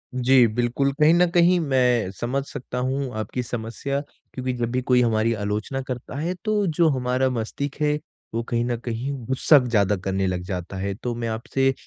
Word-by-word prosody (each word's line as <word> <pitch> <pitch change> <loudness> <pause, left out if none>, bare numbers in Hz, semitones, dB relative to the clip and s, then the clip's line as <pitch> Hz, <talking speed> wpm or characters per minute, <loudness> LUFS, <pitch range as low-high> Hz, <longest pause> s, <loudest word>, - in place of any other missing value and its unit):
जी, 130 0 +5
बिल्कुल। 120 +5 0
कहीं 155 +2 +6
न 175 +1 +5
कहीं 175 +1 +4
मैं 125 - +2
समझ 135 +3 -1
सकता 125 -1 -7
हूँ 135 0 -2
आपकी 110 +4 -3
समस्या 120 +4 -3 0.3
क्योंकि 130 -1 -2
जब 120 -1 -2
भी 130 0 0
कोई 125 0 +3
हमारी 115 -1 +2
आलोचना 105 +5 -2
करता 125 +1 -5
हैं 170 +4 -1
तो 210 -2 +2
जो 170 -2 +5
हमारा 130 0 +1
मस्तिष्क 125 +4 -3
हैं 150 0 +2 0.3
वो 115 - 0
कहीं 120 0 +1
न 120 -1 -1
कहीं 120 +4 -3 0.2
ग़ुस्सा 130 +3 +5
ज़्यादा 105 -5 +2
करने 95 +1 -1
लग 90 -1 -1
जाता 95 0 -5
है। 100 +1 -2
तो 120 +2 -4
मैं 115 -1 -3
आपसे 135 +4 0
125 Hz, 185 wpm, -24 LUFS, 115-135 Hz, 0.3 s, कहीं